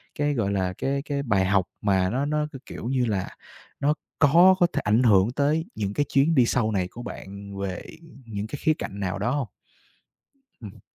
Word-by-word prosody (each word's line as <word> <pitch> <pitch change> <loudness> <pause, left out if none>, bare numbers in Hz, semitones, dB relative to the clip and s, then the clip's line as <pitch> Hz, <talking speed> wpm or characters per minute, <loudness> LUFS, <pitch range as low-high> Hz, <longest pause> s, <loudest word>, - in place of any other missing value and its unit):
cái, 145 0 0
gọi 105 -6 0
là, 95 -2 -1
cái 140 +1 -1
cái 140 -1 -3
bài 100 -7 +2
học 95 -1 +2 0.2
mà 95 -2 +2
nó 135 +6 -1
nó, 150 0 0
c 135 -3 -12
kiểu - - -8
như 130 -1 +1
là, 100 -4 -2 0.5
nó 145 +2 +2 0.3
có 170 +6 +6
có 175 - +5
thể - - 0
ảnh 110 +4 +3
hưởng 105 -1 +4
tới 150 +5 +1
những 100 -1 -2
cái 145 - +1
chuyến 145 +4 +2
đi 125 -3 +5
sau 110 -2 +1
này 95 -3 0
của 120 - -9
bạn 100 -1 -8
về 95 -2 -4 0.4
những 105 -1 -5
cái 145 - -6
khía 155 - +3
cạnh 100 -9 -6
nào 95 0 -2
đó 120 +5 0
hông? 140 -5 -1 1.1
Ừm. 105 -4 -10
115 Hz, 210 wpm, -25 LUFS, 100-145 Hz, 1.1 s, có